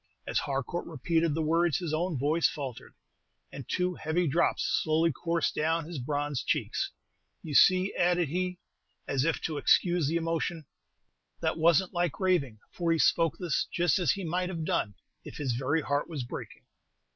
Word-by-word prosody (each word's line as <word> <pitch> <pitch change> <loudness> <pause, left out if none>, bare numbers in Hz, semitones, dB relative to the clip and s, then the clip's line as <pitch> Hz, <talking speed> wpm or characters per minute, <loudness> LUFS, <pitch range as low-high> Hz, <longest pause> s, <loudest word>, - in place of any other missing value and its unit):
As - - 0
Harcourt 140 +5 -3
repeated 165 +1 0
the 160 - 0
words, 165 -1 +2
his 170 -4 -4
own 165 0 -1
voice 150 +5 +2
faltered, 135 -6 -7 0.6
and 135 -4 -9
two 180 0 0
heavy 170 +2 -1
drops 165 +5 +1 0.2
slowly 160 +1 +2
coursed 165 +3 -1
down 160 +1 0
his 165 -3 -6
bronzed 145 -1 -2
cheeks. - - 0 0.5
"You 155 - -6
see," 185 +6 +5
added 175 -1 +2
he, 180 +2 -2 0.5
as 135 0 0
if 165 - +1
to 155 -2 -3
excuse 175 -4 +3
the 160 - -1
emotion, 165 -1 -2 0.8
"that - - 0
was 165 +2 +4
n't 185 - -12
like 175 -3 -1
raving, 175 - +1
for 170 -2 -1
he 165 - +3
spoke 165 0 +3
this 175 -5 -1
just 175 -1 +2
as 170 -7 +3
he 195 - -5
might 180 +2 -1
have 165 -4 -4
done 100 -8 -1 0.3
if - - -10
his 140 -4 -1
very 135 +6 0
heart 145 +2 -1
was 150 -6 -4
breaking." 120 - -8
165 Hz, 175 wpm, -29 LUFS, 145-175 Hz, 0.8 s, see